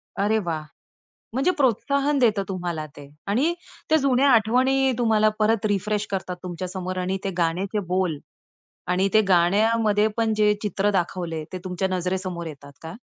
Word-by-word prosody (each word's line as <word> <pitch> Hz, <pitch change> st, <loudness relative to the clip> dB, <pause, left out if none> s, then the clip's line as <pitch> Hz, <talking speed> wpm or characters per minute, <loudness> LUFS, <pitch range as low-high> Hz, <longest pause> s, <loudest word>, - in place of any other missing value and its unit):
अरे 210 Hz, +2 st, +1 dB
वाह! 160 Hz, -2 st, -2 dB, 0.7 s
म्हणजे 270 Hz, +9 st, +2 dB
प्रोत्साहन 280 Hz, +3 st, +1 dB
देतं 215 Hz, -5 st, +3 dB
तुम्हाला 175 Hz, -5 st, -4 dB
ते. 145 Hz, -1 st, -12 dB, 0.2 s
आणि 265 Hz, +12 st, +1 dB, 0.4 s
त्या 315 Hz, -, +5 dB
जुन्या 275 Hz, -1 st, +3 dB
आठवणी 260 Hz, +3 st, +3 dB
तुम्हाला 220 Hz, -3 st, +3 dB
परत 215 Hz, 0 st, +2 dB
रिफ्रेश 205 Hz, +1 st, -1 dB
करतात 185 Hz, -2 st, -3 dB
तुमच्या 180 Hz, 0 st, -5 dB
समोर 185 Hz, 0 st, -5 dB
आणि 185 Hz, +1 st, -1 dB
ते 195 Hz, -, -1 dB
गाण्याचे 180 Hz, +5 st, 0 dB
बोल 185 Hz, -5 st, 0 dB, 0.7 s
आणि 185 Hz, +2 st, +2 dB
ते 215 Hz, -, +6 dB
गाण्यामध्ये 210 Hz, +4 st, +3 dB
पण 225 Hz, -1 st, +1 dB
जे 210 Hz, 0 st, +4 dB
चित्र 205 Hz, 0 st, 0 dB
दाखवले, 175 Hz, -3 st, -2 dB
ते -, -, -2 dB
तुमच्या 185 Hz, +1 st, -1 dB
नजरेसमोर 185 Hz, -1 st, -2 dB
येतात 140 Hz, -2 st, -10 dB
का? 160 Hz, 0 st, -8 dB
200 Hz, 150 wpm, -24 LUFS, 180-225 Hz, 0.7 s, ते